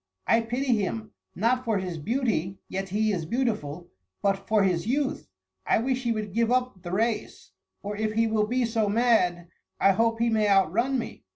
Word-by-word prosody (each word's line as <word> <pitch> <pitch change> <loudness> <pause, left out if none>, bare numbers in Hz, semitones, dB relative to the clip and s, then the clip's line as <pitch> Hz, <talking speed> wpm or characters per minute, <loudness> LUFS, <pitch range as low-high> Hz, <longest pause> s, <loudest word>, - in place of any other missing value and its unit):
I 225 - +4
pity 245 +2 0
him, 215 +2 -3 0.2
not 245 +6 +1
for 225 -4 0
his 180 -4 -4
beauty 210 - -1
(yet 195 +1 -4
he 215 +3 +1
is 180 -5 -2
beautiful), 180 - -2 0.3
but 195 -1 0
for 215 -2 +3
his 180 -1 0
youth. 265 - -1 0.3
I - - +2
wish 255 +2 0
he 235 - +1
would 215 -3 -3
give 230 +1 +1
up 250 -6 0
the 175 -1 -7
race, 225 +4 -2 0.3
or 205 +1 -4
if 215 0 -1
he 225 +1 +2
will 215 -1 +1
be 250 +2 +1
so 225 -2 0
mad, 200 -7 +2 0.3
I 195 - +5
hope 230 +3 +1
he 235 0 +1
may 215 -1 +2
outrun 200 +7 +3
me." 235 - -6
220 Hz, 190 wpm, -26 LUFS, 195-235 Hz, 0.3 s, I